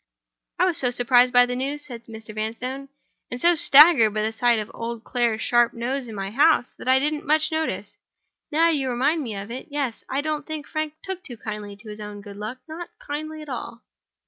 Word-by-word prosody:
"I 365 - +3
was 355 -4 +1
so 250 - +2
surprised 245 0 +4
by 245 0 +6
the 250 0 -3
news," 280 +3 -3
said 235 -3 -9
Mr. 220 -1 -9
Vanstone, 250 +6 -4 0.4
"and 245 - -5
so 345 +6 +5
staggered 285 -8 +7
by 215 - 0
the 220 +1 -1
sight 240 +1 +3
of 215 0 -4
old 230 0 -5
Clare's 235 -2 0
sharp 240 -1 +3
nose 250 +2 -3
in 225 - -8
my 195 0 -4
house, 280 +1 +3
that - - -9
I 260 0 +6
didn't 295 +2 -1
much 310 +1 +3
notice. 315 0 -3 0.5
Now 325 +3 +4
you 275 -4 0
remind 280 +7 +1
me 230 -7 -4
of 200 +3 -6
it—yes. 265 -1 -4
I 270 +2 0
don't 305 -1 -3
think 310 -2 -5
Frank 310 -1 -3
took 380 -1 -5 0.2
kindly 210 -2 -6
to 215 +2 -13
his 210 0 -8
own 210 -1 -8
good 200 -1 -11
luck; 215 +5 -5
not 335 +2 -7
kindly 310 +2 -6
at 300 - -12
all." 240 -2 -6
250 Hz, 210 wpm, -24 LUFS, 225-300 Hz, 0.5 s, staggered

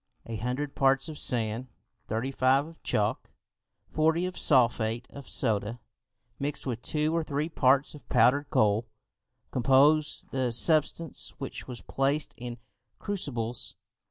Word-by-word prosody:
A 115 - -5
hundred 125 +6 -3
parts 135 0 +2
of 155 - -7
sand 115 +1 0 0.4
thirty 115 +5 -2
five 135 +1 +3
of 165 +1 -14
chalk, - - -1 0.6
forty 160 +3 +2
of 185 0 -4
sulphate 120 -3 +2
of 140 -1 -10
soda, 110 -1 0 0.6
mixed 145 +1 -1
with 120 -3 -3
two 155 +3 0
or 165 - +1
three 150 +1 -2
parts 135 -2 +3
of 150 - -14
powered 130 +4 +3
coal, 110 -4 +2 0.6
composed 140 +4 +3
the 130 -2 0
substance 155 +4 +1
which 135 - -6
was 125 -2 -7
placed 140 +3 -1
in 120 0 -7 0.4
crucibles. 120 - -4
135 Hz, 130 wpm, -28 LUFS, 120-150 Hz, 0.6 s, five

